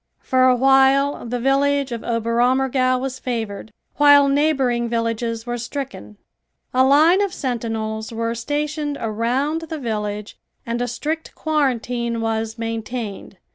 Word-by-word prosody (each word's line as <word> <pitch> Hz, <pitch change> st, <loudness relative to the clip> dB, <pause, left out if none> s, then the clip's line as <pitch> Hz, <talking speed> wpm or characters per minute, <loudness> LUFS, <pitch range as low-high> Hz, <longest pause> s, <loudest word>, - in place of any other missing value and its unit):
For 255 Hz, 0 st, +3 dB
a 255 Hz, -1 st, +5 dB
while 270 Hz, +1 st, +3 dB
the 245 Hz, +1 st, -2 dB
village 275 Hz, +1 st, +1 dB
of 235 Hz, -1 st, -4 dB
Oberammergau 255 Hz, +3 st, +1 dB
was 260 Hz, 0 st, -4 dB
favored, 225 Hz, -4 st, -4 dB, 0.3 s
while 285 Hz, -1 st, +7 dB
neighboring 270 Hz, -5 st, +1 dB
villages 230 Hz, 0 st, -2 dB
were 240 Hz, 0 st, -3 dB
stricken. 240 Hz, -, -6 dB, 0.6 s
A 255 Hz, +1 st, +4 dB
line 310 Hz, +8 st, +5 dB
of 400 Hz, -2 st, 0 dB
sentinels 225 Hz, -, -3 dB
were 230 Hz, 0 st, -2 dB
stationed 290 Hz, +4 st, -3 dB
around 245 Hz, +8 st, -1 dB
the 320 Hz, -, -4 dB
village 210 Hz, -4 st, -4 dB, 0.3 s
and 235 Hz, +1 st, -2 dB
a 245 Hz, -, 0 dB
strict 315 Hz, +5 st, -4 dB
quarantine 245 Hz, -6 st, -1 dB
was 225 Hz, 0 st, -2 dB
maintained. 225 Hz, -3 st, -5 dB
245 Hz, 130 wpm, -21 LUFS, 230-275 Hz, 0.6 s, while